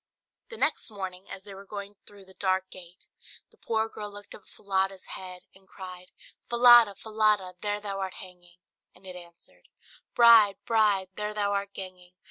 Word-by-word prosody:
The 460 Hz, -, -8 dB
next 300 Hz, -, 0 dB
morning, 190 Hz, -2 st, -7 dB
as 190 Hz, -, -9 dB
they 200 Hz, 0 st, -11 dB
were 195 Hz, +1 st, -11 dB
going 200 Hz, 0 st, -8 dB
through 200 Hz, -2 st, -15 dB
the 190 Hz, -, -17 dB
dark 190 Hz, -1 st, -1 dB
gate, 180 Hz, -1 st, -12 dB, 0.4 s
the -, -, -26 dB
poor 220 Hz, -1 st, -1 dB
girl 210 Hz, -2 st, -8 dB
looked 205 Hz, 0 st, -8 dB
up -, -, -10 dB
at -, -, -24 dB
Falada's 195 Hz, -1 st, -2 dB
head, 185 Hz, -1 st, -8 dB
and 190 Hz, 0 st, -22 dB
cried 185 Hz, -2 st, -10 dB, 0.4 s
"Falada, 240 Hz, -3 st, +7 dB
Falada, 215 Hz, -4 st, +1 dB
there 205 Hz, 0 st, -1 dB
thou 200 Hz, -1 st, -5 dB
art 190 Hz, -1 st, -4 dB
hanging!" 175 Hz, -1 st, -12 dB, 0.4 s
and -, -, -14 dB
it 185 Hz, -1 st, -7 dB
answered 170 Hz, -, -13 dB, 0.5 s
"Bride, 230 Hz, -4 st, +7 dB
bride, 210 Hz, -5 st, +2 dB
there 210 Hz, 0 st, -3 dB
thou 205 Hz, -1 st, 0 dB
art 200 Hz, 0 st, -2 dB
ganging! 185 Hz, -1 st, -9 dB
195 Hz, 175 wpm, -28 LUFS, 185-210 Hz, 0.5 s, Falada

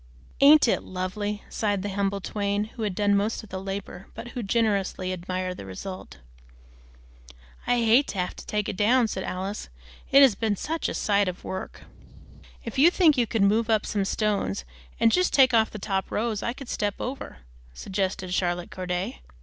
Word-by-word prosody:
"Ain't 290 Hz, 0 st, +7 dB
it -, -, +2 dB
lovely?" 205 Hz, +3 st, -4 dB
sighed 205 Hz, -3 st, -1 dB
the 205 Hz, -, -2 dB
humble 200 Hz, 0 st, -1 dB
twain, 205 Hz, +1 st, -1 dB
who 235 Hz, -, -8 dB
had 205 Hz, -4 st, -1 dB
done 205 Hz, 0 st, +2 dB
most 210 Hz, +3 st, 0 dB
of 215 Hz, -, -13 dB
the 190 Hz, 0 st, -5 dB
labor, 195 Hz, -1 st, -6 dB
but 240 Hz, -, -7 dB
who 245 Hz, -, -5 dB
generously 200 Hz, -4 st, 0 dB
admired 185 Hz, 0 st, -3 dB
the -, -, -8 dB
result. 140 Hz, -, -8 dB, 1.5 s
"I 245 Hz, -, +3 dB
hate 235 Hz, +5 st, +5 dB
to -, -, -5 dB
have 180 Hz, -1 st, -2 dB
to -, -, -9 dB
take 210 Hz, -1 st, -1 dB
it -, -, -3 dB
down," 230 Hz, +5 st, +3 dB
said 190 Hz, -3 st, -4 dB
Alice, 190 Hz, -, -4 dB, 0.4 s
"it's 275 Hz, -3 st, +7 dB
been 215 Hz, 0 st, -1 dB
such 320 Hz, -, -2 dB
a -, -, -4 dB
sight 200 Hz, -1 st, +2 dB
of 180 Hz, 0 st, -5 dB
work." 190 Hz, 0 st, -6 dB, 0.8 s
"If 230 Hz, +2 st, -4 dB
you 315 Hz, +5 st, +8 dB
think 345 Hz, -4 st, +4 dB
you 240 Hz, -3 st, +1 dB
could 220 Hz, -2 st, +1 dB
move 220 Hz, +3 st, +2 dB
up 220 Hz, -2 st, +2 dB
some 205 Hz, -2 st, -1 dB
stones 195 Hz, -, -1 dB, 0.3 s
and 225 Hz, -, +5 dB
just 365 Hz, +6 st, +2 dB
take 260 Hz, -2 st, +6 dB
off 220 Hz, -1 st, +4 dB
the -, -, -8 dB
top 195 Hz, -1 st, -2 dB
rows, 220 Hz, -1 st, -1 dB
I 235 Hz, -, -2 dB
could 270 Hz, 0 st, -10 dB
step 205 Hz, -1 st, -1 dB
out -, -, -3 dB
over," 255 Hz, -, -6 dB, 0.4 s
suggested 190 Hz, -, -3 dB
Charlotte 175 Hz, -1 st, -1 dB
Corday. 180 Hz, -, -4 dB
205 Hz, 190 wpm, -26 LUFS, 190-230 Hz, 1.5 s, you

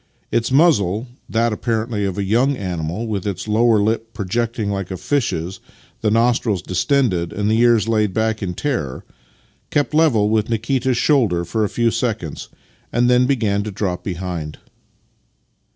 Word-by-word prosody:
Its 115 Hz, +2 st, 0 dB
muzzle 125 Hz, -, +3 dB
— -, -, -39 dB
that, 115 Hz, 0 st, +1 dB
apparently, 110 Hz, -1 st, -1 dB
of 95 Hz, -2 st, -3 dB
a 100 Hz, -, 0 dB
young 125 Hz, +7 st, +2 dB
animal, 90 Hz, +2 st, -3 dB
with 105 Hz, -3 st, -3 dB
its 100 Hz, +1 st, -4 dB
lower 110 Hz, +1 st, +3 dB
lip 110 Hz, +2 st, -1 dB
pro 105 Hz, -3 st, -3 dB
jecting 115 Hz, +1 st, -1 dB
like 100 Hz, -2 st, -3 dB
a 95 Hz, -, -4 dB
fish's, 95 Hz, -, -2 dB, 0.4 s
the 110 Hz, -, +2 dB
nostrils 115 Hz, -3 st, +1 dB
distended, 95 Hz, -, +1 dB
and 105 Hz, +1 st, -1 dB
the 110 Hz, -, +2 dB
ears 115 Hz, -3 st, +4 dB
laid 105 Hz, -3 st, +1 dB
back 110 Hz, +1 st, -1 dB
in 90 Hz, -3 st, -3 dB
terror 120 Hz, -, -3 dB, 0.3 s
— -, -, -37 dB
kept 145 Hz, -2 st, 0 dB
level 145 Hz, -10 st, +3 dB
with 110 Hz, +1 st, +1 dB
Nikita's 120 Hz, +3 st, 0 dB
shoulder 110 Hz, -, +2 dB
for 110 Hz, +6 st, -1 dB
a 105 Hz, -, 0 dB
few 115 Hz, -1 st, +1 dB
seconds, 110 Hz, -, -3 dB, 0.4 s
and 120 Hz, +1 st, +2 dB
then 125 Hz, 0 st, +4 dB
began 110 Hz, -7 st, +1 dB
to 105 Hz, -, -4 dB
drop 95 Hz, -3 st, -3 dB
behind. 85 Hz, -5 st, -5 dB
110 Hz, 170 wpm, -20 LUFS, 95-120 Hz, 0.4 s, ears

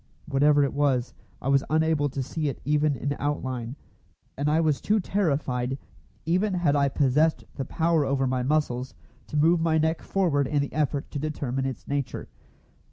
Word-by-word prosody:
Whatever 145 Hz, +1 st, +4 dB
it 140 Hz, -, -1 dB
was, 135 Hz, -4 st, +1 dB, 0.3 s
I -, -, -3 dB
was 135 Hz, 0 st, +4 dB
unable 155 Hz, -1 st, +2 dB
to 135 Hz, 0 st, -3 dB
see 155 Hz, +4 st, -3 dB
it 135 Hz, -, -6 dB
even 150 Hz, 0 st, +2 dB
in 140 Hz, +2 st, -2 dB
outline, 130 Hz, -4 st, -3 dB, 0.6 s
and 145 Hz, +2 st, 0 dB
I 155 Hz, +2 st, +3 dB
was 155 Hz, -3 st, +1 dB
too 215 Hz, +1 st, +2 dB
terrified, 140 Hz, -10 st, -1 dB, 0.5 s
even 185 Hz, +4 st, +1 dB
had 165 Hz, -5 st, +2 dB
I 140 Hz, -1 st, +3 dB
possessed 150 Hz, +4 st, +2 dB
the 135 Hz, -, -4 dB
power 165 Hz, -2 st, +1 dB
over 135 Hz, -1 st, 0 dB
my 130 Hz, 0 st, 0 dB
muscles, 130 Hz, -2 st, -1 dB, 0.3 s
to 150 Hz, -, -3 dB
move 165 Hz, +3 st, +4 dB
my 160 Hz, -1 st, +2 dB
neck 160 Hz, +1 st, +1 dB
forward 155 Hz, -8 st, +1 dB
in 145 Hz, +1 st, +1 dB
the 140 Hz, -, -6 dB
effort 145 Hz, -1 st, -1 dB
to 145 Hz, -, -3 dB
determine 135 Hz, -3 st, -2 dB
its 130 Hz, -4 st, -6 dB
nature. 140 Hz, -2 st, -3 dB
145 Hz, 175 wpm, -26 LUFS, 135-160 Hz, 0.6 s, Whatever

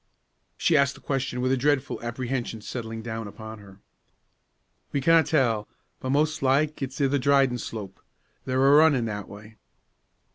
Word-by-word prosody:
She 170 Hz, -, +2 dB
asked 140 Hz, -1 st, +3 dB
the -, -, -14 dB
question 130 Hz, -2 st, -2 dB
with 130 Hz, +1 st, +1 dB
a -, -, +4 dB
dreadful 140 Hz, +1 st, 0 dB
apprehension 120 Hz, -1 st, -4 dB
settling 115 Hz, -1 st, -6 dB
down 115 Hz, -1 st, -5 dB
upon 110 Hz, +1 st, -9 dB
her. 100 Hz, -2 st, -15 dB, 1.1 s
"We 140 Hz, -, 0 dB
canna 165 Hz, +4 st, +5 dB
tell; 115 Hz, -10 st, +1 dB, 0.3 s
but 130 Hz, -, -5 dB
mos' 155 Hz, +3 st, +1 dB
like 145 Hz, +3 st, +1 dB
it's 130 Hz, -1 st, -5 dB
i' 140 Hz, -, +3 dB
the 140 Hz, +1 st, +1 dB
Dryden 135 Hz, -2 st, +3 dB
Slope. 105 Hz, -5 st, -7 dB, 0.5 s
They're 130 Hz, +1 st, +1 dB
a 140 Hz, -, +6 dB
runnin' 150 Hz, -6 st, +4 dB
that 105 Hz, -2 st, -5 dB
way." 105 Hz, +2 st, -12 dB
130 Hz, 160 wpm, -26 LUFS, 110-140 Hz, 1.1 s, a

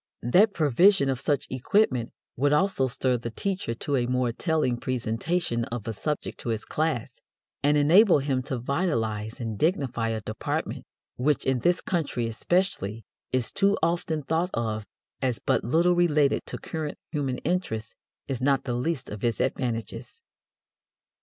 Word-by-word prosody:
That 190 Hz, -, +5 dB
provision 155 Hz, -, +4 dB
of 130 Hz, -, -2 dB
such 145 Hz, 0 st, 0 dB
equipment 130 Hz, -, +1 dB, 0.2 s
would 145 Hz, +3 st, +2 dB
also 150 Hz, -5 st, +2 dB
stir 125 Hz, 0 st, 0 dB
the 115 Hz, 0 st, -5 dB
teacher 185 Hz, -, -3 dB
to 140 Hz, +4 st, -2 dB
a 120 Hz, -1 st, 0 dB
more 125 Hz, -1 st, +1 dB
telling 150 Hz, -2 st, 0 dB
presentation 120 Hz, +3 st, -1 dB
of 115 Hz, -2 st, -6 dB
a 115 Hz, -, -2 dB
subject 150 Hz, +8 st, -3 dB
to -, -, -5 dB
his 110 Hz, -1 st, -2 dB
class, 145 Hz, -6 st, -2 dB, 0.4 s
and 145 Hz, +1 st, +3 dB
enable 175 Hz, +7 st, +6 dB
him 135 Hz, -2 st, 0 dB
to 130 Hz, -, -2 dB
vitalize 115 Hz, -, -1 dB
and 110 Hz, -4 st, -4 dB
dignify 135 Hz, -, +1 dB
a 110 Hz, -1 st, -1 dB
department 110 Hz, +1 st, -3 dB, 0.3 s
which, 145 Hz, +3 st, +1 dB
in 130 Hz, -1 st, +2 dB
this 175 Hz, +8 st, +2 dB
country 155 Hz, -9 st, -1 dB
especially, 115 Hz, -, -1 dB, 0.3 s
is 130 Hz, -2 st, 0 dB
too 200 Hz, 0 st, +2 dB
often 165 Hz, -2 st, 0 dB
thought 165 Hz, +5 st, 0 dB
of 110 Hz, -2 st, -2 dB, 0.3 s
as 125 Hz, -3 st, 0 dB
but -, -, 0 dB
little 165 Hz, +9 st, +3 dB
related 150 Hz, -5 st, +2 dB
to -, -, -4 dB
current 155 Hz, -2 st, -5 dB
human 135 Hz, -5 st, -1 dB
interests, 150 Hz, -11 st, -2 dB, 0.3 s
is 130 Hz, -3 st, -3 dB
not 135 Hz, 0 st, +2 dB
the 125 Hz, -, -2 dB
least 135 Hz, +3 st, -2 dB
of 105 Hz, -1 st, -7 dB
its 115 Hz, -3 st, 0 dB
advantages. 120 Hz, -, -3 dB
135 Hz, 155 wpm, -26 LUFS, 120-160 Hz, 0.4 s, enable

